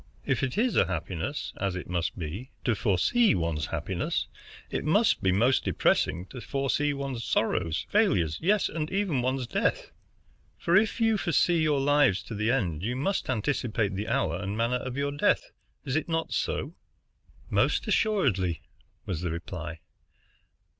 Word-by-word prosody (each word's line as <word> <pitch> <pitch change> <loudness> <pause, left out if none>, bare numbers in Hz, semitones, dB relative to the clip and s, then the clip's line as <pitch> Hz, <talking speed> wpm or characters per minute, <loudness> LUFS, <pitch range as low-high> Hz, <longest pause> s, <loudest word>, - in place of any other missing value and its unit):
If - - 0
it 130 +5 -2
is 240 +2 +2
a 95 - +4
happiness, 90 - -3
as 95 -1 -1
it 90 - -5
must 90 +2 -2
be, 90 - -5
to 120 - +2
foresee 115 - +3
one's 80 -3 -1
happiness, - - -2 0.4
it - - -2
must 205 - +3
be 95 - +3
most 120 +8 +3
depressing 90 - +1
to 125 - -8
foresee 140 +2 0
one's 135 -4 -4
sorrows, 85 -9 0
failures, 80 -2 +2
yes, 200 +4 +3
and 155 -1 -3
even 190 -9 0
one's 130 +1 -1
death. - - -1 0.7
For 170 - +1
if 220 +5 +3
you 225 -2 +3
foresee 170 -1 +2
your 150 -3 +2
lives 135 -10 +3
to 90 - -8
the 105 +1 0
end, 90 - 0
you 120 +6 -2
must 170 +8 -1
anticipate 115 -4 0
the 100 +3 -3
hour 80 +2 0
and 100 +2 -3
manner 115 +2 +1
of 130 +1 -5
your 140 0 0
death, 145 - +1 0.3
is 135 - -2
it 155 - -1
not 165 0 -1
so?" - - -2 0.8
"Most - - +2
assuredly," 110 - +1 0.4
was 85 -4 -3
the 90 - -1
reply. 85 -1 -6
125 Hz, 160 wpm, -28 LUFS, 90-150 Hz, 0.8 s, a